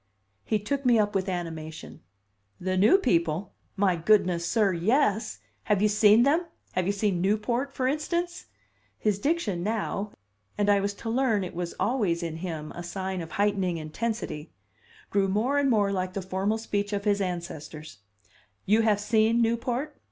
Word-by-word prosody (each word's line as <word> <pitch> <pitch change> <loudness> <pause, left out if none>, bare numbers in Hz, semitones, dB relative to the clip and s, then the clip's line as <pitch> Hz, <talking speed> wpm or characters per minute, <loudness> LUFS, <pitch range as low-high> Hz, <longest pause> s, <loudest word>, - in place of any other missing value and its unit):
He 215 - +1
took 275 +7 -3
me 245 -3 +4
up 210 -1 +1
with 195 -1 -1
animation. 160 -3 -6 0.6
"The 185 +1 -1
new 210 - +6
people! 170 - 0 0.2
My 195 -3 +2
goodness, 175 -1 +2
sir, 210 -5 +2
yes! 220 - +1 0.3
Have 210 -2 +2
you 210 - +4
seen 210 +2 +5
them? 320 +6 +2 0.2
Have 185 -1 -1
you - - +3
seen 200 -3 0
Newport, 225 +7 0
for 260 -1 -1
instance?" 340 - -2 0.5
His 205 - 0
diction 235 - 0
now 210 0 -2 0.5
(and 205 0 +3
I 200 - +4
was 200 +1 -2
to 225 - -6
learn 230 -5 +2
it 185 - -6
was 175 0 -4
always 200 -9 0
in 160 -1 -4
him 160 -3 -5
a 175 - -7
sign 190 +1 -4
of 165 - -8
heightening 200 -4 +1
intensity) 160 -1 -4 0.6
grew 200 -1 +2
more 230 +9 +1
and 280 -1 +2
more 205 -4 +3
like 185 -1 -2
the 195 - -4
formal 190 +4 -1
speech 205 -2 -2
of 200 0 -2
his 205 -1 +2
ancestors. 160 - -6 0.7
"You 215 +3 +4
have 215 -2 +2
seen 220 +2 +2
Newport?" 240 +5 -1
205 Hz, 165 wpm, -27 LUFS, 180-225 Hz, 0.7 s, new